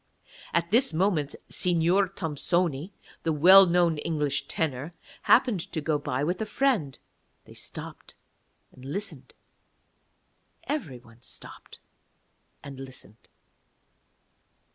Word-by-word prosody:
At 170 +1 -1
this 240 -5 +3
moment 160 -5 0
Signor 180 +2 +2
Thompsoni, 170 -2 -1 0.3
the 165 - -1
well 185 +6 +8
known 170 -3 +2
English 150 -3 -2
tenor, 155 +1 -3 0.3
happened 240 -5 +4
to 160 - -1
go 150 0 -1
by 135 -1 -2
with 175 +6 -2
a - - -1
friend. 210 - 0 0.5
They - - -15
stopped - - -10 0.6
and 130 - -17
listened; 190 +11 -6 1.3
everyone 125 - -6
stopped - - -13 0.9
and 135 -2 -9
listened. 130 -4 -11
165 Hz, 100 wpm, -27 LUFS, 140-185 Hz, 1.3 s, well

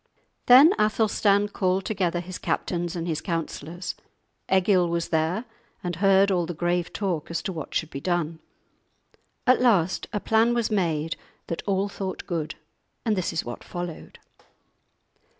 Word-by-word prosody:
Then 275 +8 +9
Athelstan 210 -1 +2
called 185 -1 0
together 180 -5 0
his 180 +1 -7
captains 175 -1 -2
and 170 0 -3
his 160 -2 -1
counsellors; 170 0 -4 0.6
Egil 185 -2 +4
was 170 0 -1
there, 165 +8 0 0.4
and 175 -2 -3
heard 195 +1 +4
all 175 -3 +1
the 175 - -5
grave 175 +1 0
talk 185 -7 -2
as 170 - -3
to 190 - -3
what 155 -4 -7
should 160 - -1
be 140 - -6
done. 170 -2 -1 1.1
At 255 0 +5
last 190 -8 +2
a 210 - -1
plan 225 +3 +3
was 235 -2 0
made 165 -6 0 0.3
that 170 - -4
all 195 0 +1
thought 195 -2 -5
good, 165 -5 -3 0.5
and 220 -2 +2
this 185 -3 -1
is 165 - -2
what 120 0 -7
followed. 175 -2 -7
180 Hz, 150 wpm, -25 LUFS, 170-200 Hz, 1.1 s, Then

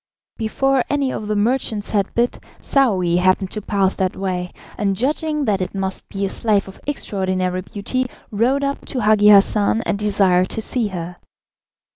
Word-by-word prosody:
Before 260 +4 +1
any 280 -2 0
of 210 - -5
the 210 - -1
merchants 215 -1 0
had 200 -2 0
bid, 240 +1 +1 0.2
Saouy 190 -11 +2
happened 185 +1 +2
to 215 - -4
pass 195 -2 +1
that 185 -1 -1
way, 180 -2 -3 0.2
and 200 -2 0
judging 300 +5 -1
that 200 -4 +1
it 185 - -4
must 190 -1 -3
be 200 0 -2
a - - -2
slave 205 -2 +1
of 195 - -12
extraordinary 185 -8 -1
beauty, 215 +7 -3 0.2
rode 250 +7 +1
up 280 0 -2
to 255 - -3
Hagi 210 -1 +5
Hassan 210 +2 +4
and 200 - -1
desired 195 -3 +2
to 220 - -3
see 235 -1 +1
her. 175 -2 -6
205 Hz, 170 wpm, -20 LUFS, 190-240 Hz, 0.2 s, Hagi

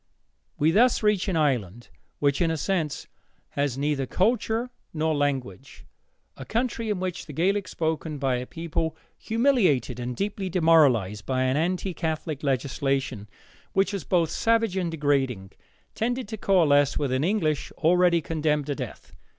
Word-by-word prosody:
We 155 +2 +3
thus 235 +5 +3
reach 210 -2 +2
an 190 - 0
Ireland 120 - 0 0.3
which, 140 +1 +1
in 170 - +3
a 160 - -1
sense, 160 -3 -2 0.4
has 140 -3 -1
neither 140 -1 -1
culture 230 - 0 0.2
nor 160 0 +1
language, 135 -9 -3 0.5
a - - -8
country 230 -1 -2
in 205 -3 -1
which 185 -1 -4
the 150 - -8
Gaelic 190 +5 +1
spoken 160 -2 -2
by 135 -2 0
a 125 +1 -5
people 165 -1 -3 0.2
humiliated 215 - +1
and 125 0 -4
deeply 200 - -3
demoralized 140 - +3
by 130 -1 +1
an 130 +1 +1
anti 180 +4 -1
Catholic 160 -3 -3
legislation, 135 -4 -1 0.4
which 195 +1 +2
was 195 - -3
both 170 -4 +1
savage 225 -3 +1
and 180 -3 -1
degrading, 135 -10 0 0.4
tended 245 +1 -2
to 220 - -4
coalesce 150 -9 +3
with 140 -3 -1
an 130 +2 +1
English 160 -6 0
already 175 +1 +3
condemned 150 -2 0
to 145 - -2
death. - - -8
160 Hz, 150 wpm, -26 LUFS, 135-190 Hz, 0.5 s, We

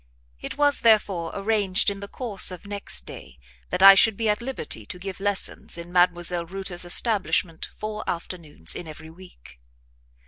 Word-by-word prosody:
It - - -7
was, 290 -1 +4
therefore, 200 -7 +2
arranged 200 -2 0
in 200 -1 0
the 200 - -8
course 220 -3 0
of 180 +2 -8
next 200 0 -1
day 60 0 -12 0.3
that 185 - -1
I 195 0 +11
should 200 +1 +4
be 225 -2 -1
at 210 +1 0
liberty 235 - -4
to 105 - -9
give 190 +1 -8
lessons 200 -3 -1
in 170 +1 -10
Mdlle. 175 -1 +1
Reuter's 190 -2 -2
establishment 175 -4 +1
four 215 0 -5
afternoons 165 - -4
in 170 - -8
every 160 +1 -11
week. 160 - -16
190 Hz, 165 wpm, -24 LUFS, 170-205 Hz, 0.3 s, I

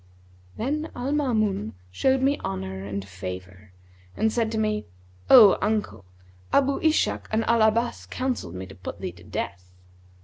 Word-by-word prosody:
Then 300 +7 -2
Al 250 +3 -3
Maamun 215 - 0 0.2
showed 265 - +2
me 280 +2 +2
honour 95 0 -4
and 100 -1 -5
favour 95 +1 -8 0.5
and 220 0 +1
said 225 -2 0
to 225 - -2
me, 215 -1 0 0.4
'O 220 -7 +9
uncle, 210 - -1 0.5
Abu 280 0 +3
Ishak 315 -1 +1
and 220 +1 +1
Al 230 -1 +3
Abbas 230 +2 +1
counselled 250 - -3
me 95 +1 -5
to 95 - -12
put 90 0 -8
thee - - -4
to - - -17
death.' 90 -2 -5
215 Hz, 150 wpm, -25 LUFS, -, 0.5 s, O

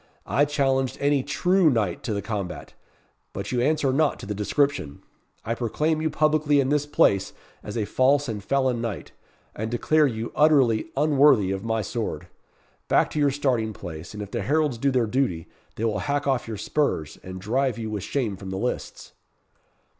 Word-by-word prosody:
I 145 +3 +2
challenged 135 -3 0
any 145 -1 +2
true 175 +5 +2
knight 105 -9 0
to 110 - -1
the 100 - -3
combat, 100 -6 -5 0.6
but - - -5
you 125 -1 +1
answer 140 -1 +1
not 150 +1 +2
to - - -9
the 105 - -3
description. 105 - -1 0.4
I 115 - 0
proclaim 150 +7 -1
you 160 - 0
publicly 150 -1 +2
in 135 -1 +1
this 145 0 +1
place 100 -9 +2 0.3
as 105 +2 -6
a 110 - 0
false 135 +6 +2
and 105 -4 -4
felon 130 0 +1
knight, 115 -5 -5 0.4
and 110 +1 -3
declare 150 +6 +3
you 115 -2 -4
utterly 135 -8 +3
unworthy 140 -8 +4
of 95 0 -3
my 110 -1 -1
sword. - - -4 0.6
Back - - +3
to 155 - -2
your 145 -1 +4
starting 125 -6 0
place, 85 0 -8
and 105 - -5
if 100 - -10
the 120 - -2
heralds 145 +2 0
do 140 - +2
their 125 -3 +2
duty, 110 -8 -1 0.3
they 115 - -2
will 105 -2 0
hack 145 +8 -1
off 135 -4 0
your 110 -2 -5
spurs, 100 - -1
and 95 0 -8
drive 125 +5 0
you 110 -2 -4
with 105 -2 -3
shame 110 -2 -2
from 95 0 -8
the 95 - -4
lists." 125 +5 -4
125 Hz, 185 wpm, -25 LUFS, 105-145 Hz, 0.6 s, unworthy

